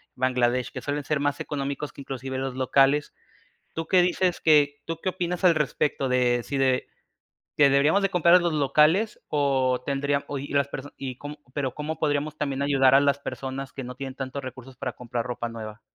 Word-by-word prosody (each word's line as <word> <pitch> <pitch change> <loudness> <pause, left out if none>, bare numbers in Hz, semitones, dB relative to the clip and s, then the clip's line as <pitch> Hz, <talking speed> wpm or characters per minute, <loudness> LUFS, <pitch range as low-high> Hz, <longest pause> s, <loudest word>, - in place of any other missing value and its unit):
Bangladesh, 125 -1 +1
que - - -6
suelen 145 -1 -3
ser 150 -2 0
más 145 0 0
económicos 140 0 -4
que - - -10
inclusive 135 -1 -5
los 135 -1 -3
locales. 135 +2 +2 0.6
¿Tú 165 0 -3
qué 185 - +4
dices? 180 0 +1
que 145 -2 +4
¿Tú 165 -1 -4
qué 190 - 0
opinas 180 0 -3
al 175 -2 +6
respecto 150 -2 0
de 125 -1 +2
si 140 - -4
de 130 -1 +1 0.7
que 140 -2 +6
deberíamos 150 +8 +3
de 195 - +2
comprar 175 0 +5
a - - +7
los 170 -2 0
locales 155 - +3
o 135 -4 +1
tendrían 140 +1 0
o 145 - -4
y 140 - -6
las 140 -1 +1
personas 140 0 -8
y 130 -2 -6
cómo 145 +1 -8 0.2
pero 135 -3 -1
cómo 150 +2 -4
podríamos 150 0 -1
también 140 -2 -2
ayudar 135 -2 +4
a 135 - +8
las 140 -1 +2
personas 135 -1 -6
que 135 - -6
no 125 +1 -7
tienen 135 0 -6
tantos 135 0 -5
recursos 130 0 -9
para 130 -3 -4
comprar 120 -1 -4
ropa 120 -1 -4
nueva? 110 -1 -8
140 Hz, 205 wpm, -25 LUFS, 130-150 Hz, 0.7 s, a